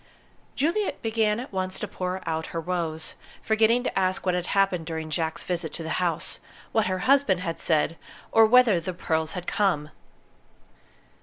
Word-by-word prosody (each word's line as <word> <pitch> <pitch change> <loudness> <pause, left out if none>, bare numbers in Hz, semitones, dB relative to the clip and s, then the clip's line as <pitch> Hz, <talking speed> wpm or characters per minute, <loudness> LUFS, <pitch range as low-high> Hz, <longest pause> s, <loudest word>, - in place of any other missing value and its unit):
Juliet 345 +8 0
began 220 -1 +1
at 250 -3 -8
once 185 0 -2
to 210 - -4
pour 185 -1 -4
out 160 0 -2
her 165 - -4
woes, 165 -2 -2 0.3
forgetting 225 +2 +3
to - - -3
ask 185 0 0
what 180 - +2
had 180 -1 -2
happened 190 -4 +1
during 160 -1 -4
Jack's 160 +1 -2
visit 170 -3 -2
to 165 - -5
the 160 - -5
house 170 -3 -1 0.3
what 220 -3 +2
her 185 0 0
husband 265 -9 +4
had 165 -2 -3
said, 160 0 +1 0.3
or 225 -1 +7
whether 235 -5 +6
the 175 +2 -5
pearls 160 -2 -1
had 180 -2 -5
come. 170 -8 0
180 Hz, 170 wpm, -26 LUFS, 165-215 Hz, 0.3 s, or